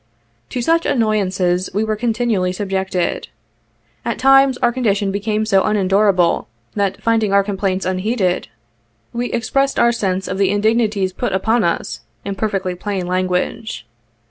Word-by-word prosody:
To 245 - -3
such 330 +4 +2
annoyances 190 -6 +1
we 210 - +2
were 220 -1 -1
continually 225 -4 0
subjected. 190 -1 -2 0.8
At 235 - -2
times 270 -1 +5
our 240 - +2
condition 205 -5 0
became 210 +2 -1
so 195 -3 +3
unendurable, 195 -3 +2 0.3
that 200 -2 -1
finding 225 -3 +2
our 200 0 +4
complaints 195 -1 -2
unheeded, 185 - 0 0.7
we 240 +1 -2
expressed 275 +4 0
our 235 - +4
sense 195 -5 -2
of 190 - -3
the 195 -2 +3
indignities 205 -2 +1
put - - -2
upon 220 +4 +2
us, 170 - -1 0.3
in 200 - -2
per 215 +2 -1
fectly 185 -3 -3
plain 195 -3 -3
language. 185 - -2
200 Hz, 145 wpm, -18 LUFS, 185-225 Hz, 0.8 s, times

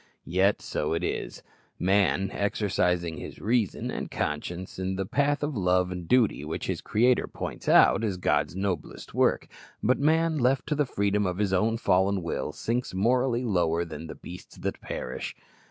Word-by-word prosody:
Yet 95 +4 +2
so 75 - -2
it 85 +2 -1
is. - - -3 0.3
Man, 95 +1 +2
exercising 90 -5 0
his - - -8
reason 115 -3 0
and - - -4
conscience 85 +5 -4
in 95 0 -2
the 95 0 -2
path 145 +7 +1
of 145 -1 -2
love 90 -2 +2
and 90 -2 -6
duty 115 - +3
which 75 +2 -4
his - - -2
Creator 120 +3 +2
points - - -5
out, - - +6
is 100 -4 -1
God's 75 -2 +1
noblest 95 -4 -4
work; - - +2 0.4
but 125 +3 +3
man, 160 +1 +2
left 130 +2 +2
to - - +2
the 145 -2 +1
freedom 100 -2 +1
of 90 0 -2
his 100 -2 0
own 110 +5 +2
fallen 95 -3 +2
will, 85 - -3
sinks 120 -3 -2
morally 125 +4 +2
lower 85 -5 +1
than 80 0 -7
the 80 - -7
beasts 90 +1 -11
that - - -4
perish. 60 - -5
95 Hz, 170 wpm, -27 LUFS, 90-120 Hz, 0.4 s, out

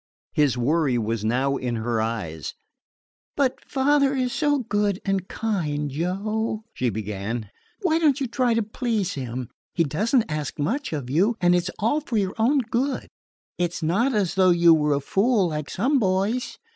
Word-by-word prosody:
His 145 -4 +2
worry 140 +1 +2
was 115 -1 -2
now 130 +5 +1
in 125 -2 -2
her 115 0 -1
eyes. 100 -9 -4 0.8
"But 270 -3 +1
father 280 0 +2
is 255 -2 0
so 290 -2 +2
good 205 -4 0
and 195 -2 0
kind, 150 -10 -2
Joe," 210 +8 -2
she 125 - 0
began. 105 +1 -4 0.3
"Why 325 -3 +3
don't 300 -3 +3
you 275 - 0
try 245 -1 +1
to 230 - +2
please 220 -3 -2
him? 125 -2 -5 0.2
He 170 - +3
does 200 - -1
n't 240 - +4
ask 150 -1 -4
much 225 - -1
of 140 -5 -4
you, 195 - +3
and 175 -1 +4
it 175 0 +2
's - - -2
all 230 +9 +1
for 255 -6 -2
your 195 -2 0
own 265 +5 +3
good. 260 +3 -1 0.5
It 175 0 0
's - - -5
not 220 +11 +2
as 195 -5 +1
though 190 -1 +4
you 170 -1 +6
were 150 -2 +2
a 140 - -1
fool, 195 - +2
like 150 -2 -4
some 265 +8 +1
boys. 200 +4 0
185 Hz, 185 wpm, -24 LUFS, 140-235 Hz, 0.8 s, you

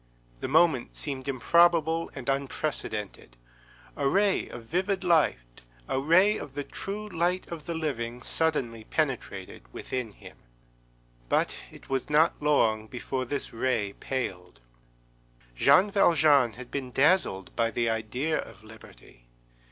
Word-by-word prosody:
_ - - -29
the - - -3
moment 155 -3 +2
seemed 135 -3 -5
improbable 165 +4 +3
and 130 -3 -8
unprecedented; 135 - -3 0.6
a 140 -1 0
ray 200 +4 +2
of 120 - -9
vivid 190 - -1
light, 145 - +1 0.3
a 130 - -1
ray 185 +9 +4
of 135 - -9
the 145 - -2
true 205 +8 -6
light 180 -1 -1
of 165 -3 -7
the 170 - -3
living, 125 -7 -3
suddenly 130 -9 0
penetrated 100 - -3
within 125 - -5
him. - - -14 0.9
But - - +1 0.2
it - - -15
was 135 0 -2
not 155 +2 +3
long 110 -7 +2
before 130 +2 -4
this 140 +3 -4
ray 115 -4 -1
paled. 90 - -5 1.0
Jean 190 - +5
Valjean 150 - +4
had 125 +2 -11
been 135 -3 -4
dazzled 135 - +1
by 115 -1 +1
the 115 0 -1
idea 115 +8 -1
of 110 - -9
liberty. 110 - -16
135 Hz, 135 wpm, -27 LUFS, 115-165 Hz, 1.0 s, Jean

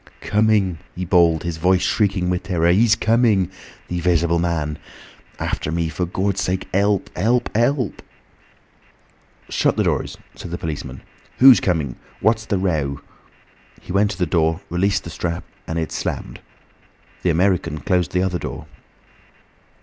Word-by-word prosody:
"Coming!" 105 -5 +2 0.2
he 90 +1 -4
bawled, 85 -3 +3
his 85 -2 -3
voice 90 +2 +2
shrieking 95 -4 +1
with 90 0 -1
terror. 85 -4 +1
"He's 110 +4 +4
coming. 110 -5 +2 0.4
The 90 - -3
'Visible 85 -1 +2
Man! 80 -3 -1 0.6
After 75 - -3
me! 85 0 -1
For 90 +2 -2
Gawd's 95 +2 -1
sake! 95 0 -2
'Elp! 100 +1 +1
'Elp! 120 +5 +1
'Elp!" 120 0 0 1.5
"Shut - - +1
the - - +2
doors," - - -1 0.2
said - - -9
the 85 - -4
policeman. 75 -6 -6 0.4
"Who's 130 -1 +8
coming? 80 -9 -1 0.2
What's 110 0 +1
the 100 - 0
row?" 75 -7 -1 0.8
He - - -10
went 100 +2 +3
to 95 - -5
the 90 - +1
door, 80 +1 +1
released 100 +3 +1
the 85 - -8
strap, 85 +1 -3 0.2
and 80 - -3
it 80 -1 -2
slammed. - - -4 0.8
The 90 - +1
American 90 -2 +1
closed 90 +2 0
the 90 0 +1
other 90 -2 -1
door. - - -6
90 Hz, 150 wpm, -21 LUFS, 85-100 Hz, 1.5 s, Who's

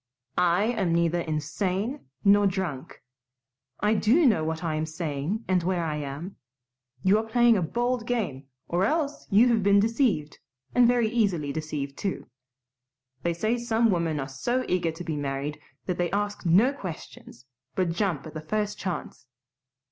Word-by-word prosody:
"I 180 +2 +3
am 210 -7 +1
neither 170 0 +2
insane 180 - -2 0.2
nor 200 0 +6
drunk. 180 -9 -4 0.8
I 210 +2 +3
do 235 +10 +4
know 215 - +4
what 160 +1 -3
I 165 -2 -1
am 155 +1 -1
saying 155 +6 -3
and 185 -1 +2
where 175 0 0
I 155 -2 -2
am. 150 +6 -6 0.7
You 200 +3 +4
are - - -2
playing 240 0 +4
a 195 - +1
bold 240 +6 -1
game 165 - -2 0.2
or 175 +2 +1
else 295 +5 -1
you 220 +5 +6
have 230 -2 +3
been 200 +1 +5
deceived, 215 - +1 0.3
and 245 -1 +6
very 240 -2 +3
easily 195 -11 0
deceived, 150 -3 -4
too. 195 - -3 0.9
They 170 -1 -1
say 220 +7 0
some 230 -1 +2
women 165 -4 0
are 135 - -3
so 240 - -1
eager 180 -2 +1
to 165 +2 -6
be 160 -3 -3
married 145 +1 -3 0.3
that 180 -1 -2
they 175 -1 +1
ask 205 0 -2
no 210 +11 +5
questions, 165 - -9 0.3
but 185 -3 +1
jump 170 -4 -1
at 155 - -9
the 155 - -5
first 210 +5 -2
chance. 180 -8 -5
185 Hz, 165 wpm, -27 LUFS, 155-220 Hz, 0.9 s, nor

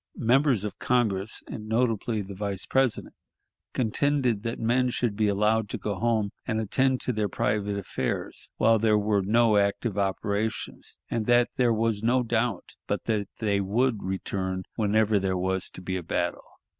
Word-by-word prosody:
Members 125 -2 +3
of 105 - -6
Congress, 110 -5 0
and 110 -1 -7
notably 115 -2 0
the 100 +1 -8
Vice 100 -1 -3
President, 130 -3 0 0.6
contended 125 -1 +1
that 115 +1 -3
men 125 +3 +2
should 120 -3 -1
be 105 0 +2
allowed 105 +1 +2
to - - -3
go 105 - -3
home 110 -1 0 0.2
and 110 -3 0
attend 130 +4 +1
to 125 - -1
their 105 -2 -1
private 105 +1 -1
affairs 100 - -4
while 115 0 +4
there 110 -1 +3
were 105 -1 +2
no 110 +2 +3
active 100 +1 0
operations, 100 +2 -2
and 110 -2 -1
that 120 0 +4
there 125 -2 +3
was 110 -2 0
no 125 +3 +2
doubt 115 -3 -1
but - - -1
that 105 -3 -1
they 100 -3 +1
would 110 +3 +1
return 95 0 -3
whenever 110 -1 +2
there 95 -1 0
was 95 +1 -1
to 90 - -11
be 95 0 -2
a - - -4
battle. 80 - -2
110 Hz, 170 wpm, -27 LUFS, 100-120 Hz, 0.6 s, while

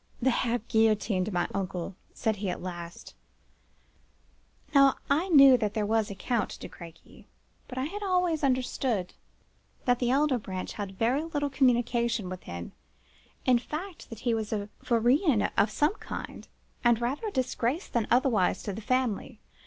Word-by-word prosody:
"'They 260 - +2
have 235 -1 -1
guillotined 215 -3 +2
my 175 -2 0
uncle!' 185 -1 -3 0.2
said 220 -1 -1
he 195 -1 -2
at - - -3
last. 175 -2 -8 1.6
Now, 275 -1 +6 0.2
I 325 +7 +2
knew 275 -5 +8
that 215 -2 -2
there 215 -1 0
was 220 0 +1
a 200 - -6
Count 225 +4 -2
de - - -7
Crequy; 165 -2 -14 0.4
but 255 - -9
I 260 - 0
had 400 +9 -4
always 360 -5 +1
understood 255 -6 0 0.7
that 245 -1 +3
the 245 - +1
elder 275 -1 +2
branch 185 -3 -5
held 200 -2 -5
very 240 +9 +1
little 290 -3 -2
communication 240 -5 +1
with 185 -1 -6
him; 85 0 -7 0.7
in 250 -2 +5
fact, 325 +8 -7
that 230 -1 -9
he 240 -2 +1
was 220 -2 -2
a 205 -1 -2
vaurien 245 - +3
of 200 +2 +3
some 295 - +1
kind, - - -8 0.4
and 240 -2 +4
rather 265 - -2
a - - -3
disgrace 260 - -1
than 235 -3 -1
otherwise 240 -6 +2
to 205 - -3
the 220 - -6
family. 250 0 -1
235 Hz, 160 wpm, -28 LUFS, 205-270 Hz, 1.6 s, knew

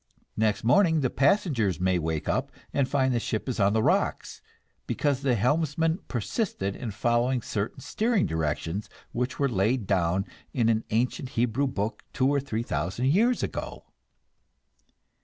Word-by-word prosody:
Next 105 -1 +1
morning 160 - +4
the 130 - 0
passengers 135 - +2
may 90 -1 +2
wake 80 -1 -2
up - - 0 0.2
and 140 -2 +1
find 130 -2 +2
the 120 - +1
ship 110 0 -3
on 100 0 +4
the 110 0 +2
rocks - - 0 0.5
because 140 -3 0
the 135 -3 +2
helmsman 160 - +1
persisted 115 - -2
in 120 - -5
following 120 +3 +1
certain 105 +5 -3
steering 220 - +1
directions 80 +5 -2 0.2
which 125 +1 -2
were 140 - +2
laid 110 +1 +1
down 95 0 +1 0.3
in 115 -3 +3
an 110 -1 +1
ancient 125 +3 0
Hebrew 125 +4 +2
book 110 -4 -3
two 130 - +2
or 140 0 +2
three 115 -5 -3
thousand 95 - -1
years 230 - +3
ago! - - -5
120 Hz, 150 wpm, -27 LUFS, 100-140 Hz, 0.5 s, morning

